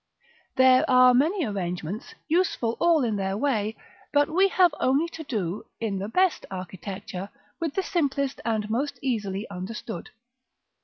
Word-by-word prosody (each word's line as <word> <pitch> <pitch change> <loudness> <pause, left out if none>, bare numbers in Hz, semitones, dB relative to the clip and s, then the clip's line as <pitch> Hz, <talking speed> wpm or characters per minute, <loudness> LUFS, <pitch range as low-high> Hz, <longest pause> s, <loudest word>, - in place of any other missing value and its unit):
There 260 0 +6
are 255 -1 +7
many 320 +8 +2
arrangements, 185 - -4
useful 315 -9 +1
all 335 -4 +4
in 220 -4 0
their 195 0 -1
way, 220 -4 0 0.3
but 290 0 +3
we 380 +4 +4
have 365 -4 +4
only 275 +6 +2
to 325 - -8
do, 210 - -3
in 210 -4 -2
the 200 +2 -4
best 370 +7 +2
architecture, 190 +2 -6 0.3
with 325 -4 -2
the 385 - +1
simplest 280 -7 -1
and 220 -2 -1
most 255 +7 -1
easily 210 -5 -2
understood. 195 +1 -6
235 Hz, 145 wpm, -26 LUFS, 200-290 Hz, 0.3 s, are